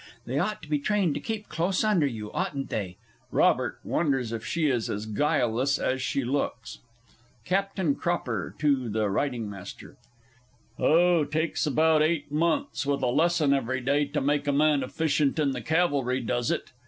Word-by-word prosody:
They 130 +4 -1
ought 210 +4 -2
to - - -10
be 150 -1 0
trained 195 -1 +1
to - - -3
keep 215 +6 -5
close 175 +6 0
under 195 -9 +3
you, 110 -5 -6
oughtn't 140 -2 -3
they? 95 -4 -3 0.3
[ROBERT - - +2
wonders 135 -7 0
if 115 -1 -4
she 170 -2 -1
is 120 -5 0
as 105 +1 -3
guileless 125 +3 +1
as 130 0 -1
she 135 +1 -1
looks.] 125 -3 -3 0.7
CAPT. 190 -5 0
CROPPER 125 - -2
(to 140 -5 +1
the 110 +1 0
R. 100 -2 +1
M.) 115 -9 -3 1.2
Oh, 170 0 +4
takes 155 +2 -1
about 155 +2 +3
eight 155 -2 0
months, 170 - 0
with 140 -1 -1
a 125 - +2
lesson 160 0 +3
every 130 -1 -1
day, 140 +3 +1
to 140 - -2
make 145 +1 0
a - - +3
man 145 0 +3
efficient 145 +2 0
in 145 -3 +2
the 125 -2 -4
Cavalry, 140 -3 +1
does 120 0 -1
it? - - -2
145 Hz, 170 wpm, -27 LUFS, 125-160 Hz, 1.2 s, Oh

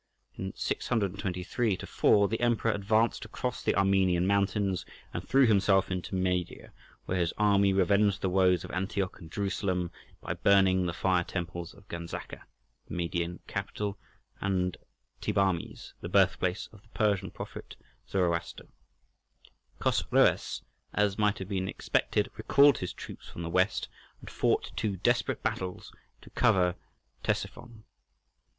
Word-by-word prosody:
In 95 0 -4
623 100 0 -1
4 100 +2 +3
the 115 +3 -2
Emperor 120 -1 +2
advanced 110 +3 +1
across - - -4
the - - +1
Armenian 95 -2 +3
mountains 100 -1 +1 0.3
and - - -3
threw 135 0 +6
himself 100 -3 +3
into 90 +1 -3
Media, 90 -1 -2 0.3
where 90 - -1
his 85 -1 0
army 100 -2 +4
revenged 100 +1 +3
the 95 - +1
woes 90 -1 +3
of - - -8
Antioch 95 0 -2
and 80 -3 -12
Jerusalem 95 -3 -1 0.3
by - - -3
burning 95 -2 +4
the - - -1
fire 90 0 +2
temples 85 -1 -5
of 100 0 -19
Ganzaca—the 85 0 -9
Median 85 +1 -2
capital—and 95 -2 -4 0.5
Thebarmes, 95 -4 -1
the - - -5
birthplace 90 +1 +2
of 105 - -15
the 110 - -26
Persian 100 -3 +1
prophet - - -8 0.3
Zoroaster. 85 -3 -1 1.1
Chosroës, - - +2 0.3
as 105 0 +1
might 105 -1 +2
have 95 0 -7
been 95 -2 -1
expected, - - 0
recalled 140 0 +5
his 90 - -3
troops - - -10
from 85 - -7
the 85 - -4
west, 95 +3 +1 0.3
and - - -11
fought - - 0
two 100 -3 -1
desperate 120 +7 +1
battles 90 -1 -3 0.3
to - - -15
cover 90 -2 +3 0.5
Ctesiphon. 120 -2 -3
95 Hz, 130 wpm, -29 LUFS, 90-100 Hz, 1.1 s, threw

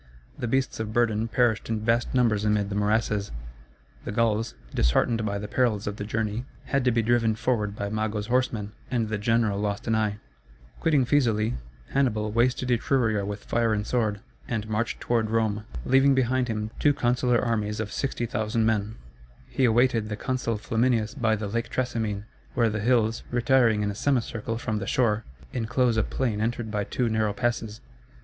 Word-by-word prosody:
The 120 - -4
beasts 130 +1 0
of 110 -1 -3
burden 115 -2 +2
perished 115 -2 +1
in 110 -1 -1
vast 115 +1 +2
numbers 115 -5 +3
amid 105 -1 +1
the 100 - -3
morasses; 105 0 +1 0.7
the - - -4
Gauls, 115 +1 0 0.2
disheartened 110 - +2
by 100 0 -1
the 105 +1 -5
perils 115 -5 +1
of 105 0 -4
the - - -4
journey, 110 +2 -2 0.2
had 140 -1 0
to 125 - +4
be 115 -1 +1
driven 115 -1 +2
forward 105 -3 -1
by 100 - -3
Mago's 110 0 -2
horsemen, 120 -4 0 0.2
and 115 -4 0
the 110 -1 -2
general 110 -2 +1
lost 105 +1 -2
an 115 - +1
eye. 105 -2 +1 0.6
Quitting 150 -5 +3
Fæsulæ, 115 -6 +2 0.4
Hannibal 110 -6 +1
wasted 125 +2 +1
Etruria 115 -3 +1
with 100 0 -5
fire 115 -2 +1
and 105 0 -2
sword, 110 -5 0 0.3
and 110 -4 -2
marched 110 +2 -1
toward 115 -2 0
Rome, 110 -1 0 0.2
leaving 135 +1 +5
behind 130 0 +1
him 110 -1 -3
two 145 -1 +3
consular 125 -2 +2
armies 105 -3 -1
of 110 -2 -3
60,000 115 -4 -1
men. 110 -1 0 0.5
He 130 - +1
awaited 115 -2 +3
the 105 - -2
consul 125 -2 -1
Flaminius 115 +1 +1
by 115 -5 +1
the 105 -1 -4
Lake 115 +3 -2
Trasimene, 110 -5 -2 0.3
where 115 -2 +3
the 110 - -2
hills, 115 0 +2
retiring 120 -3 +3
in 105 - 0
a - - -5
semicircle 115 -2 -1
from 110 -2 -2
the 100 - -5
shore, 110 -4 +1 0.3
inclose 120 +1 +1
a 110 - +3
plain 110 -3 -1
entered 115 0 -2
by 105 -1 -1
two 125 - -1
narrow 110 -2 +1
passes. 115 -3 -2
110 Hz, 175 wpm, -26 LUFS, 105-120 Hz, 0.7 s, leaving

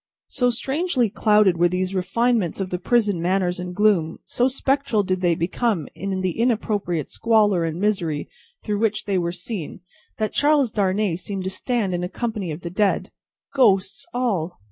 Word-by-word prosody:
So 245 -1 +1
strangely 265 - 0
clouded 210 -5 +3
were 175 +1 +4
these 185 +1 -1
refinements 195 +1 +1
by 195 - -1
the 180 -1 -4
prison 205 -3 +1
manners 180 0 0
and 180 0 -5
gloom, 195 -6 +2
so 245 - +1
spectral 265 -4 +1
did 185 -1 -1
they 175 -2 +3
become 180 +1 -1
in 190 -1 -3
the 185 +1 -2
inappropriate 210 - 0
squalor 210 -6 +3
and 165 +1 -3
misery 180 -8 -1 0.4
through 210 -2 -1
which 215 -1 0
they 195 -2 +1
were 170 -1 -1
seen, 180 -1 -6 0.4
that 215 -1 -2
Charles 290 -5 +3
Darnay 200 -3 0
seemed 190 +1 -5
to 190 - -3
stand 220 -3 -1
in 175 0 -2
a 180 - -3
company 220 -5 -3
of 155 +3 -6
the 170 - -6
dead. 200 +2 0 0.4
Ghosts 250 +1 +2
all! 205 -9 -1
195 Hz, 170 wpm, -23 LUFS, 180-230 Hz, 0.4 s, were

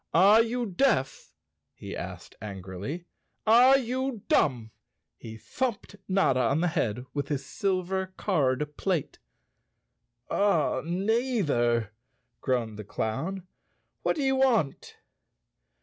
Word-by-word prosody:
"Are 200 +6 +7
you 240 +1 -1
deaf? 190 - 0 0.2
" - - -55
he - - -7
asked - - -7
angrily. 100 - -6 0.4
"Are 245 +5 +7
you 255 -2 -3
dumb?" 120 -6 +2 0.4
He 110 0 -10
thumped 235 - -3
Notta 185 -9 +2
on 140 +4 +2
the 175 - +2
head 125 -6 -1
with 145 -1 -2
his 140 -2 -3
silver 190 +2 -1
card 150 -5 0
plate. 180 -7 -2 1.1
"Neither," 175 - +1 0.5
groaned 115 -5 -1
the - - -5
clown. 155 - -3 0.6
"What - - +1
do 295 - -2
you 265 0 +2
want?" 230 - +1
175 Hz, 110 wpm, -28 LUFS, -, 1.1 s, Are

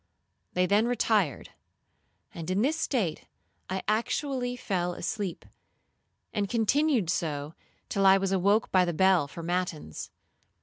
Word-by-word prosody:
They 180 0 +2
then 205 +5 +3
retired, 215 - +1 0.8
and 165 0 -6
in 190 +4 +1
this 295 +5 +2
state 215 - -1 0.4
I 190 0 -2
actually 245 +3 -1
fell 180 -7 -2
asleep, 190 0 -4 0.9
and 200 -2 -1
continued 240 - +2
so 150 -3 -2 0.3
till 195 -1 +2
I 190 0 +7
was 195 0 -1
awoke 200 +3 +2
by 185 -1 +5
the 175 -1 -1
bell 185 -3 +4
for 165 +4 -9
matins. 175 - -3
190 Hz, 130 wpm, -28 LUFS, 175-220 Hz, 0.9 s, I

